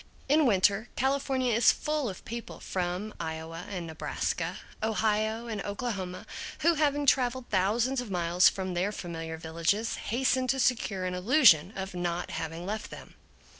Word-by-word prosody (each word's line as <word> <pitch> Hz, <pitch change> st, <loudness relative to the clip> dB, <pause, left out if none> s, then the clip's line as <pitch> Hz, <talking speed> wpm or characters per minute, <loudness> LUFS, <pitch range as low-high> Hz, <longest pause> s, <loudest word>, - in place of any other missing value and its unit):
In 295 Hz, +1 st, +4 dB
winter, 200 Hz, +1 st, +3 dB
California 265 Hz, -2 st, +1 dB
is 230 Hz, +1 st, +6 dB
full 300 Hz, -5 st, -1 dB
of 185 Hz, -, -9 dB
people 235 Hz, +1 st, -7 dB
from 185 Hz, +3 st, -3 dB
Iowa 160 Hz, 0 st, -5 dB
and 180 Hz, -4 st, -4 dB
Nebraska, 160 Hz, -1 st, -3 dB, 0.2 s
Ohio 220 Hz, +1 st, 0 dB
and 220 Hz, -4 st, -4 dB
Oklahoma, 200 Hz, -4 st, -4 dB, 0.4 s
who, 335 Hz, +2 st, +5 dB
having 290 Hz, -2 st, +1 dB
traveled 255 Hz, -2 st, +2 dB
thousands 230 Hz, +7 st, +2 dB
of 245 Hz, -, -8 dB
miles 175 Hz, -1 st, +4 dB
from 185 Hz, -1 st, -4 dB
their 180 Hz, +4 st, 0 dB
familiar 165 Hz, -4 st, -5 dB
villages, 170 Hz, +7 st, -1 dB
hasten 255 Hz, +2 st, 0 dB
to 270 Hz, +1 st, +1 dB
secure 215 Hz, -7 st, +1 dB
an 180 Hz, -, -2 dB
illusion 185 Hz, -, +5 dB
of 190 Hz, -1 st, -5 dB
not 175 Hz, 0 st, -2 dB
having 165 Hz, +2 st, -4 dB
left 215 Hz, +3 st, -4 dB
them. -, -, -11 dB
205 Hz, 150 wpm, -29 LUFS, 180-250 Hz, 0.4 s, is